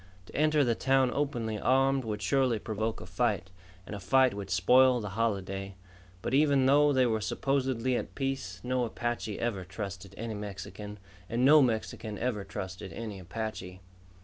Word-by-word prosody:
To -, -, -14 dB
enter 155 Hz, 0 st, +3 dB
the 120 Hz, -3 st, +2 dB
town 130 Hz, +1 st, +2 dB
openly 120 Hz, -7 st, -2 dB
armed 135 Hz, +1 st, +2 dB
would 105 Hz, -2 st, -4 dB
surely 130 Hz, 0 st, +2 dB
provoke 110 Hz, +1 st, -3 dB
a -, -, -8 dB
fight, 95 Hz, 0 st, -1 dB, 0.3 s
and -, -, -8 dB
a 100 Hz, -, -5 dB
fight 130 Hz, +6 st, +3 dB
would 100 Hz, -1 st, -6 dB
spoil 125 Hz, +8 st, +5 dB
the 105 Hz, -3 st, -5 dB
holiday. 95 Hz, -2 st, -2 dB, 0.5 s
But 120 Hz, -, -2 dB
even 140 Hz, -2 st, +4 dB
though 145 Hz, +2 st, +5 dB
they 130 Hz, -2 st, +3 dB
were 110 Hz, -2 st, 0 dB
supposedly 130 Hz, +1 st, 0 dB
at -, -, -4 dB
peace, 135 Hz, -10 st, -3 dB
no 125 Hz, 0 st, 0 dB
Apache 120 Hz, -2 st, -3 dB
ever 110 Hz, -6 st, -2 dB
trusted 95 Hz, 0 st, -7 dB
any 115 Hz, 0 st, -4 dB
Mexican 105 Hz, 0 st, -7 dB, 0.3 s
and 120 Hz, +3 st, +1 dB
no 150 Hz, +2 st, +8 dB
Mexican 110 Hz, -3 st, -1 dB
ever 115 Hz, -5 st, -2 dB
trusted 95 Hz, -1 st, -6 dB
any 105 Hz, +2 st, -6 dB
Apache. 95 Hz, -1 st, -6 dB
115 Hz, 165 wpm, -30 LUFS, 100-130 Hz, 0.5 s, no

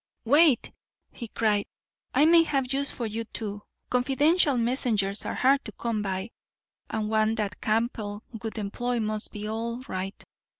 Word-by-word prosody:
"Wait!" 290 Hz, +1 st, +5 dB, 0.4 s
he 235 Hz, -, -7 dB
cried. 210 Hz, -2 st, +1 dB, 0.5 s
"I 295 Hz, -, +6 dB
may 335 Hz, +1 st, +7 dB
have 275 Hz, -5 st, 0 dB
use 280 Hz, +1 st, 0 dB
for 240 Hz, -, -3 dB
you 225 Hz, +1 st, -3 dB
too. 205 Hz, -2 st, -5 dB, 0.3 s
Confidential 285 Hz, +4 st, +3 dB
messengers 230 Hz, -5 st, 0 dB
are -, -, -2 dB
hard 275 Hz, +2 st, +3 dB
to 215 Hz, -, -4 dB
come 230 Hz, -3 st, -2 dB
by, 195 Hz, +2 st, -3 dB, 0.6 s
and 215 Hz, -1 st, -2 dB
one 220 Hz, 0 st, +2 dB
that 205 Hz, -4 st, -3 dB
Campbell 215 Hz, -2 st, -1 dB, 0.2 s
would 225 Hz, 0 st, -5 dB
employ 240 Hz, +4 st, -2 dB
must 215 Hz, -1 st, -2 dB
be 210 Hz, -1 st, -5 dB
all 230 Hz, +2 st, -3 dB
right. 190 Hz, -1 st, -4 dB
225 Hz, 155 wpm, -27 LUFS, 210-255 Hz, 0.6 s, may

